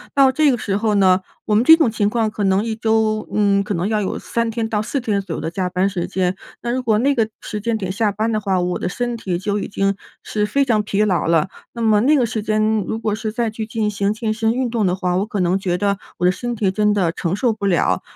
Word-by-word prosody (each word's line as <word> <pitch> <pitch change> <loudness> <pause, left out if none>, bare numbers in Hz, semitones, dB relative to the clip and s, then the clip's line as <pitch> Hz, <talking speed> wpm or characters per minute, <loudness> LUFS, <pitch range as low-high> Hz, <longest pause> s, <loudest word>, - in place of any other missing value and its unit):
到 270 -1 +5
这 300 +3 +3
个 250 - +2
时 200 -3 -2
候 210 0 +1
呢， 190 -1 +4 0.2
我 215 - 0
们 215 +2 +4
这 320 +5 +8
种 310 -9 +2
情 210 -2 +1
况 220 -1 0
可 210 - -3
能 190 +1 +2
1 225 -1 -2
周， 220 -1 0
嗯， 200 -1 +2
可 205 0 -3
能 170 +3 -1
要 215 -1 0
有 190 - -2
3 230 0 -2
天 225 0 -2
到 215 -2 -1
4 275 +6 -2
天 210 -5 -1
左 185 -4 -5
右 - - -4
的 160 - -3
加 185 0 -2
班 185 +2 +1
时 185 -3 -3
间。 185 -1 -1 0.3
那 240 - -1
如 255 +1 -1
果 225 -4 +2
那 275 +6 +2
个 225 -5 0
时 210 - -5
间 230 +1 0
点 190 -4 -3
下 205 +2 0
班 215 +3 -1
的 215 - 0
话， 195 -2 0
我 180 0 -1
的 - - -2
身 240 +5 -2
体 190 -6 -3
就 205 +3 -2
已 - - -4
经 195 0 0 0.3
是 210 -1 -1
非 280 +5 +1
常 225 -5 +2
疲 210 0 0
劳 185 -5 0
了。 165 +2 +2 0.2
那 235 - -6
么 215 -2 +4
那 290 +6 +4
个 255 -4 +3
时 220 -1 -3
间 215 0 +1
如 220 - -2
果 220 -2 -1
是 215 +1 -3
再 230 0 -1
去 220 0 -5
进 220 -1 -1
行 200 -1 0
健 220 0 -2
身 220 0 0
运 255 +1 -1
动 230 -2 -1
的 180 - +1
话， 180 -1 -1
我 195 - 0
可 215 -2 -4
能 180 +1 +2
觉 180 -2 -1
得 200 0 0 0.2
我 180 - +1
的 180 - +5
身 240 +5 -4
体 205 -4 0
真 210 +1 +2
的 185 -5 +1
承 170 +1 -2
受 235 +3 +1
不 215 -2 -4
了。 180 -4 +2
210 Hz, 295 characters per minute, -20 LUFS, 195-225 Hz, 0.3 s, 这